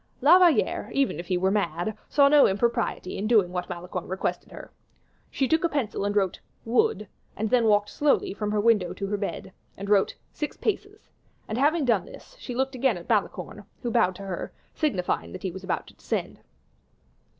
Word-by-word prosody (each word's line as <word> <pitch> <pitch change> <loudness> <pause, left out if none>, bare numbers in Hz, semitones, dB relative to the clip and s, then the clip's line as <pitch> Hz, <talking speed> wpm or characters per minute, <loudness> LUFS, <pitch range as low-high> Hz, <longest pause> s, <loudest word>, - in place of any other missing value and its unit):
La 325 +8 +7
Valliere, 350 -4 +3
even 275 -8 +1
if 175 - -7
he 185 - +1
were 190 +2 +1
mad, 195 0 -1
saw 280 -1 +5
no 290 0 +6
impropriety 230 -2 -1
in 210 - -1
doing 210 -6 +4
what 180 -1 -4
Malicorne 180 0 -5
requested 190 +1 -3
her; - - -10 0.6
she 270 - 0
took 320 +3 +2
a 340 - +2
pencil 240 -9 -2
and 205 0 -1
wrote 195 -3 +1 0.3
"Wood," 235 - +1 0.3
and 220 0 -2
then 245 -2 +4
walked 205 -1 +3
slowly 290 -8 +1
from 210 +1 -3
her 210 0 0
window 205 -5 +3
to 195 +2 -5
her 205 +1 -2
bed, 200 -1 -5 0.2
and 200 +1 -5
wrote, 200 -2 +3 0.2
"Six 300 - -4
paces," 410 0 -4 0.4
and 220 +3 -3
having 300 +2 +3
done 240 - +2
this, - - -14
she 245 - -6
looked 265 +1 0
out - - -7
again 250 -6 +2
at 170 - -11
Malicorne, 210 -1 -1 0.2
who 240 - -1
bowed 200 -7 +2
to 200 - -9
her, 190 -3 -5 0.2
signifying 180 - -1
that - - -8
he 190 - -2
was 190 +2 -9
about 190 - -2
to - - -16
descend. - - -4
210 Hz, 200 wpm, -26 LUFS, 190-265 Hz, 0.6 s, La